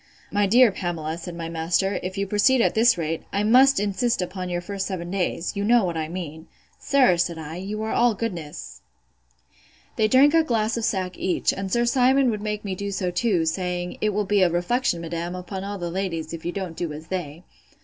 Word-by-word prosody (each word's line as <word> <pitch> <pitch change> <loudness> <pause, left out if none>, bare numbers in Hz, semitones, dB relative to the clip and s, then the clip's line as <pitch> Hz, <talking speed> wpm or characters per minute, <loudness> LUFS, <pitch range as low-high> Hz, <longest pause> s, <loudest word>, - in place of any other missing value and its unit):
—My 205 0 +2
dear 240 +2 +6
Pamela, 165 -4 -3
said 170 +1 -8
my 165 -1 -5
master, 170 +4 0
if 185 +1 -5
you 200 - 0
proceed 210 +6 +3
at - - +3
this 230 0 +4
rate, 165 -1 -2
I 200 - 0
must 255 +4 +5
insist 205 +4 0
upon 180 0 -4
your 175 0 -1
first 195 +2 -4
seven 175 -3 -5
days. 185 -1 -2
You 200 - -2
know 235 +1 +4
what 170 -2 -2
I 160 -1 -2
mean. 160 -3 -7 0.3
Sir, 260 -10 +3
said 170 -1 0
I, 160 +1 -7
you 205 +4 -4
are 220 - -2
all 240 -2 +3
goodness! 175 -9 -6 1.2
They 215 - +3
drank 270 +6 +5
a 330 - +6
glass 225 -5 0
of 230 -2 -1
sack 185 -2 -2
each, 185 - +1
and 195 -1 -5
Sir 240 +3 +2
Simon 260 +1 +3
would 210 -2 -4
make 210 0 -4
me 195 - -2
do 200 +2 -4
so 190 -2 -2
too, 180 -3 +1
saying, 180 +1 -3
It 215 - +2
will 210 0 -1
be 205 0 +2
a 180 - +5
reflection, 175 +2 0
madam, 170 +1 -4
upon 185 +1 -6
all 200 +1 -4
the 175 -2 -4
ladies, 170 -4 -3
if 165 -1 -7
you 175 - -1
don't 185 -3 -5
do 170 -2 -3
as 155 +2 -9
they. 170 -3 -5
190 Hz, 220 wpm, -24 LUFS, 175-215 Hz, 1.2 s, dear